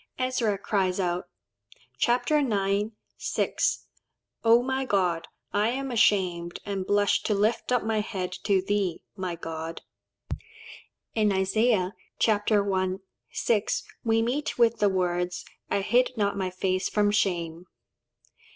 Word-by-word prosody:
Ezra 255 -5 0
cries 190 -2 0
out 175 -1 0 0.7
(ch. - - +2
ix. 225 -6 +2 0.3
6), - - 0 0.6
"O, 230 +1 +6
my 265 +1 -1
God! 185 -8 +1 0.3
I 210 +2 +2
am 270 +2 -2
ashamed, 180 -6 +2
and 195 -2 -3
blush 205 0 +3
to 210 - 0
lift 215 +5 +1
up 250 - +2
my 220 0 0
head 190 -4 -3
to 195 -2 +3
thee, 195 -4 -1
my 185 -3 -3
God." 165 0 -6 1.3
In 215 -2 +2
Isaiah 195 0 +2 0.2
(ch. - - +3
I. 205 -3 +2 0.4
6) 215 -3 0 0.2
we 225 0 +2
meet 265 +6 -1
with 235 -1 +3
the 205 - +4
words, 180 -1 -1 0.2
"I 200 - +1
hid 245 +6 +2
not 200 -2 +1
my 190 -2 -1
face 185 +1 -1
from 205 -1 +2
shame." 175 -4 -1
205 Hz, 130 wpm, -27 LUFS, 185-225 Hz, 1.3 s, O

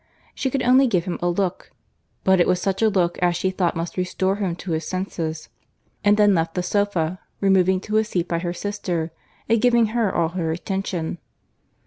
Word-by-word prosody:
She 265 - -1
could 265 0 -1
only 260 +2 +5
give 185 -7 +1
him 180 - -3
a 175 - +1
look; 185 +1 -2 0.5
but 190 -1 +4
it - - +3
was 180 -1 +2
such 195 +2 -1
a 220 - +5
look 180 -4 0
as 175 -1 +2
she 190 - 0
thought 185 -2 0
must 165 +2 -4
restore 185 +2 0
him 190 -5 -1
to 175 0 -7
his 160 0 -1
senses, 165 -4 -4 0.5
and 205 0 +4
then 205 -1 +5
left 165 -2 0
the 180 - -1
sofa, 185 -3 0 0.2
removing 190 -1 +3
to 215 +1 -1
a 220 - +4
seat 185 -5 -2
by 170 -1 -1
her 175 0 -2
sister, 175 -4 -3 0.4
and 230 -1 +2
giving 240 -2 +4
her 230 -5 +1
all 165 -1 +1
her 170 -2 -2
attention. 175 -1 -3
185 Hz, 200 wpm, -23 LUFS, 175-205 Hz, 0.5 s, only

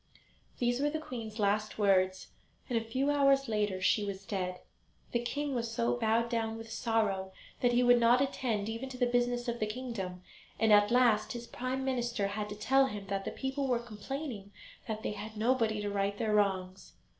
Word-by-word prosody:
These 245 0 +1
were 290 +1 +2
the 315 - -2
queen's 230 -8 -7
last 210 0 0
words, 185 -2 +2 0.4
and 245 - -2
a 225 - +1
few 260 +5 0
hours 275 -1 +4
later 210 -4 0
she 195 +3 +2
was 195 -1 -5
dead. 185 -2 -3 0.5
The 240 - +1
king 285 +4 -2
was 235 -2 -1
so 235 +1 0
bowed 230 0 +1
down 225 -2 -1
with 225 0 -9
sorrow 210 -5 0 0.3
that 245 -1 +2
he 245 +1 +4
would 245 0 +6
not 235 +1 +5
attend 245 -6 -1
even 230 +4 -4
to 255 - -8
the 250 - +3
business 245 0 0
of 235 0 -2
the 215 - 0
kingdom, 210 -6 -5 0.4
and 220 -1 +5
at 205 0 +6
last 235 -3 +3
his 240 0 -6
Prime 255 +2 -3
Minister 240 -5 -1
had 210 +1 -3
to 205 - -5
tell 270 +6 +3
him 205 -5 -6
that 195 0 -2
the - - -3
people 270 +1 -2
were 250 -2 +2
complaining 235 -1 -6 0.4
that 220 -1 -4
they - - -1
had 215 +1 -7
nobody 225 -2 +1
to 205 - -2
right 200 0 -1
their 220 -1 0
wrongs. 190 -2 0
225 Hz, 200 wpm, -32 LUFS, 205-245 Hz, 0.5 s, would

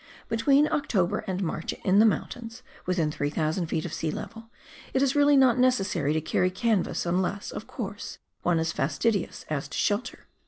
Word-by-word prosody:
Between 275 +6 +4
October 210 - +1
and 190 0 -2
March 160 -1 -3
in 195 +1 +4
the 220 - +7
mountains, 230 +1 -3 0.2
within 170 -4 +1
3,000 155 +4 -1
ft. 160 - -1
of 170 - -5
sea 160 - -2
level, 225 +8 -7 0.5
it 265 - +3
is 275 0 +1
really 290 0 +5
not 255 -2 +5
necessary 195 - +2
to 160 - 0
carry 180 +3 +1
canvas, 200 0 0
unless, 185 +3 -1
of - - -7
course, - - -6 0.2
one 175 -1 +2
is 160 0 0
fastidious 175 +9 -1
as 145 -2 -3
to - - -6
shelter. 205 +4 -1
190 Hz, 170 wpm, -27 LUFS, 160-230 Hz, 0.5 s, the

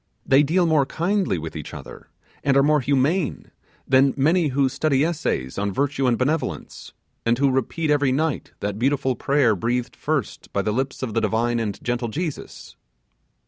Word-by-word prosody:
They 135 +1 +5
deal 170 +5 +2
more 155 -5 +3
kindly 180 - 0
with 80 0 -6
each 75 - -7
other, - - -11 0.3
and 140 -1 +3
are 140 - +5
more 150 +1 +4
humane 140 +5 0 0.4
than 135 +1 +4
many 160 +4 +3
who 140 0 +2
study 140 +1 +1
essays 145 - -2
on 100 0 -1
virtue 135 +4 0
and 120 -2 +2
benevolence, 150 +5 -3 0.3
and 115 +1 +2
who 140 0 +3
repeat 150 +5 -1
every 145 -2 +3
night 150 +2 -1
that 105 0 -3
beautiful 135 0 +1
prayer 135 -4 +2
breathed 120 +5 -2
first 155 -4 -3
by 100 - -1
the 105 - -1
lips 130 +3 -2
of 115 -4 -3
the - - +1
divine 120 +1 0
and 105 -3 -3
gentle 120 0 -1
Jesus. 155 +6 -6
135 Hz, 175 wpm, -23 LUFS, 120-150 Hz, 0.4 s, They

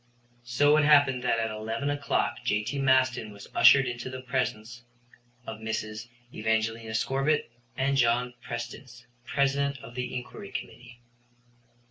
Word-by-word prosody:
So 145 +5 +4
it 155 - +4
happened 140 -4 +5
that 125 - +1
at 110 -1 -1
11 115 +6 -3
o'clock 140 -7 -1
J.T. 110 +4 -1
Maston 130 -4 +2
was 100 -1 -12
ushered 135 -1 +7
into 120 0 -4
the 130 0 -7
presence 125 -2 -3 0.6
of 110 0 -7
Mrs. 110 0 -4 0.3
Evangelina 110 0 -1
Scorbitt 135 +5 0 0.3
and 135 +1 +1
John 125 0 +2
Prestice, 120 0 -7 0.2
President 140 0 +1
of 120 - -10
the 125 0 -4
Inquiry 130 +11 -7
Committee. 120 0 -8
125 Hz, 130 wpm, -28 LUFS, 115-135 Hz, 0.6 s, ushered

